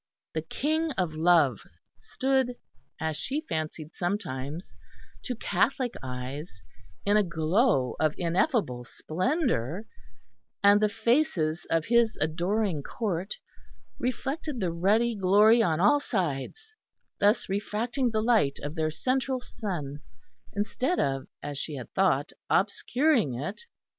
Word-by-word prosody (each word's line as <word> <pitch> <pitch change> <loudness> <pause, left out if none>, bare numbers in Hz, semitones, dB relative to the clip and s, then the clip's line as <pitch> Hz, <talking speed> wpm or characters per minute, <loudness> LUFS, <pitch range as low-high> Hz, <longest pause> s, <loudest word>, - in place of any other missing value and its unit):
The 160 - -1
King 310 - -1
of 180 -7 -1
Love 155 - +4 0.4
stood, 265 -2 0 0.4
as 160 -1 -1
she 290 - -3
fancied 155 0 -4
sometimes, 170 -4 -3 0.5
to 250 - -2
Catholic 245 +1 0
eyes, 130 - -6 0.4
in 205 +1 +4
a 210 - +4
glow 165 - +2
of 155 0 +2
ineffable 175 - +1
splendour; 185 - -1 0.8
and 205 +1 +6
the 215 - +4
faces 220 - +1
of 165 -1 +1
His 235 -1 +3
adoring 175 +2 0
Court 190 - -3 0.6
reflected 270 +2 -2
the 180 -4 0
ruddy 210 +8 +2
glory 205 +4 +5
on 165 -6 +2
all 210 +11 +5
sides; 190 - -3 0.5
thus 205 +3 +3
refracting 225 +6 -1
the 215 -1 0
light 220 -13 +3
of 145 +1 -4
their 160 -1 0
central 255 - 0
Sun, 170 - -5 0.5
instead 215 - 0
of, 135 -1 0 0.2
as 145 -1 -4
she 150 - -4
had 125 -3 -8
thought, 170 -7 +2 0.2
obscuring 225 - +2
it. 150 - -5
195 Hz, 120 wpm, -28 LUFS, 155-235 Hz, 0.8 s, and